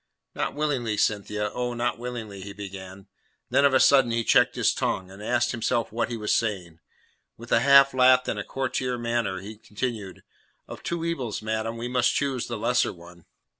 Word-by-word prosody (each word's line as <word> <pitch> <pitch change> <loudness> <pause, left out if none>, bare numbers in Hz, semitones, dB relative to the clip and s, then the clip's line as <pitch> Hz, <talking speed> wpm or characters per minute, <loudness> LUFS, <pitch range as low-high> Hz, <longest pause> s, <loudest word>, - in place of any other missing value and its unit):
"Not - - -3
willingly, 135 -8 -1
Cynthia. 105 0 -1
Oh, 125 -1 -3
not 120 0 -1
willingly," 115 -5 -6
he 100 +1 -8
began. 95 -1 -9 0.5
Then 140 - +4
of 140 - +4
a - - +6
sudden 135 -3 +5
he 115 0 0
checked - - +4
his - - +2
tongue, 95 0 -2
and 95 +2 -12
asked 120 +3 +1
himself 115 -1 -1
what 115 +1 -1
he 120 - -4
was 105 -1 -2
saying. 90 -8 -1 0.6
With 120 +1 -12
a - - +5
half 140 0 +6
laugh 130 0 +5
and - - -2
a - - -3
courtier 130 -1 -2
manner, 115 -5 -2
he 105 +2 -9
continued, 105 -3 -5 0.4
"Of - - -9
two 170 -1 -3
evils, 130 -11 -3
madam, 110 +1 -2
we 120 +1 -4
must 125 0 +1
choose 135 -4 -1
the - - -4
lesser 120 +3 +1
one." 85 -1 -15
115 Hz, 190 wpm, -25 LUFS, 105-125 Hz, 0.6 s, a